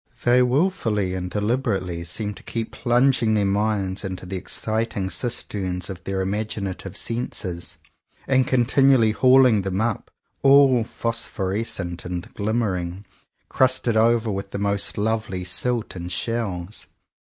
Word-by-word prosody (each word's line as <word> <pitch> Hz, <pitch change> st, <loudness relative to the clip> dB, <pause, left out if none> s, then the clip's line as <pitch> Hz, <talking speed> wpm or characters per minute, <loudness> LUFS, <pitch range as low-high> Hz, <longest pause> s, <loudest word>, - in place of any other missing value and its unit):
They 125 Hz, +1 st, +5 dB
wilfully 125 Hz, -, +1 dB
and 90 Hz, -1 st, -3 dB
deliberately 105 Hz, -4 st, -1 dB
seem 105 Hz, +5 st, -3 dB
to -, -, -13 dB
keep 115 Hz, -1 st, -4 dB
plunging 120 Hz, -2 st, +2 dB
their 105 Hz, -1 st, +2 dB
minds 100 Hz, -1 st, 0 dB
into 95 Hz, -2 st, -5 dB
the 95 Hz, +1 st, -5 dB
exciting 110 Hz, 0 st, -2 dB
cisterns 95 Hz, -6 st, -2 dB
of 90 Hz, -2 st, -9 dB
their 95 Hz, 0 st, -1 dB
imaginative 100 Hz, -1 st, -3 dB
senses, 95 Hz, -7 st, -3 dB, 0.5 s
and 130 Hz, -1 st, +3 dB
continually 130 Hz, -2 st, +4 dB
hauling 125 Hz, -2 st, +5 dB
them 95 Hz, 0 st, -2 dB
up, 110 Hz, -1 st, -1 dB, 0.3 s
all 135 Hz, -3 st, +6 dB
phosphor 115 Hz, -5 st, -3 dB
escent 95 Hz, -5 st, -2 dB
and 90 Hz, 0 st, -6 dB
glimmering 100 Hz, -4 st, -2 dB, 0.2 s
— -, -, -50 dB
crusted 130 Hz, -3 st, +2 dB
over 115 Hz, 0 st, +3 dB
with 100 Hz, 0 st, -4 dB
the 100 Hz, -, -5 dB
most 100 Hz, 0 st, -1 dB
lovely 105 Hz, -3 st, -1 dB
silt 115 Hz, +5 st, -1 dB
and 90 Hz, 0 st, -6 dB
shells. 100 Hz, -2 st, -2 dB
105 Hz, 130 wpm, -23 LUFS, 95-120 Hz, 0.5 s, all